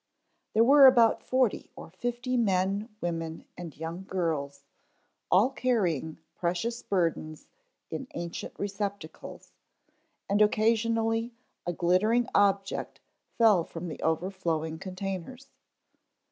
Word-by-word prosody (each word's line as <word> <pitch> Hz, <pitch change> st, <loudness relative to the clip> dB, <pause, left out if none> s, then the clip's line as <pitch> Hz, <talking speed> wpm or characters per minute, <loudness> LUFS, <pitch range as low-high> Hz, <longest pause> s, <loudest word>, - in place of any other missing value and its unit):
There 225 Hz, -, +5 dB
were 275 Hz, +2 st, +8 dB
about 235 Hz, -3 st, +5 dB
forty 255 Hz, -4 st, 0 dB
or -, -, -11 dB
fifty 245 Hz, +6 st, -3 dB
men, 200 Hz, -1 st, +1 dB
women 165 Hz, -1 st, -4 dB
and 170 Hz, -4 st, -9 dB
young 165 Hz, +4 st, -6 dB
girls, 150 Hz, -7 st, -2 dB, 0.7 s
all 210 Hz, +9 st, +4 dB
carrying 180 Hz, -, 0 dB, 0.2 s
precious 180 Hz, +7 st, -2 dB
burdens 165 Hz, -4 st, -2 dB, 0.5 s
in 265 Hz, -, -5 dB
ancient 170 Hz, 0 st, -6 dB
receptacles, 200 Hz, -4 st, -6 dB, 0.8 s
and 205 Hz, +1 st, +2 dB
occasionally 225 Hz, +2 st, +2 dB, 0.3 s
a 175 Hz, -, 0 dB
glittering 210 Hz, +8 st, +2 dB
object 195 Hz, -1 st, +1 dB, 0.4 s
fell 215 Hz, -7 st, +5 dB
from 170 Hz, +1 st, -7 dB
the -, -, -8 dB
over 160 Hz, +4 st, 0 dB
flowing 160 Hz, -4 st, -2 dB
containers. 195 Hz, +8 st, -6 dB
195 Hz, 105 wpm, -28 LUFS, 170-230 Hz, 0.8 s, were